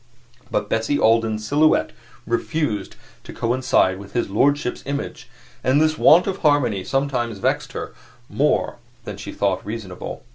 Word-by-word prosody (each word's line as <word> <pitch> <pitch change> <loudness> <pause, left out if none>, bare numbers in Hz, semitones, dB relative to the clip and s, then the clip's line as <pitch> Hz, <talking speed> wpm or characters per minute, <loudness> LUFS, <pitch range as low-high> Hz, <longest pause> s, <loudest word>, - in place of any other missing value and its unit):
But - - -1
Bessie 115 +6 0
Alden's 110 -2 +2
silhouette 155 +5 +3 0.3
refused 115 -3 -2 0.3
to - - -10
coincide 115 -6 +1
with 100 0 -12
his 120 -5 -1
lordship's 140 +4 +1
image, 140 0 -5 0.3
and 130 +3 +3
this 155 0 +2
want 165 +3 +6
of 195 -1 -2
harmony 135 - +2
sometimes 130 -5 -1
vexed 95 - -1
her - - -6 0.3
more 145 -3 0 0.3
than 105 -4 -7
she 105 - -7
thought 100 -2 -1
reasonable. 105 -4 -7
120 Hz, 140 wpm, -22 LUFS, 105-145 Hz, 0.3 s, want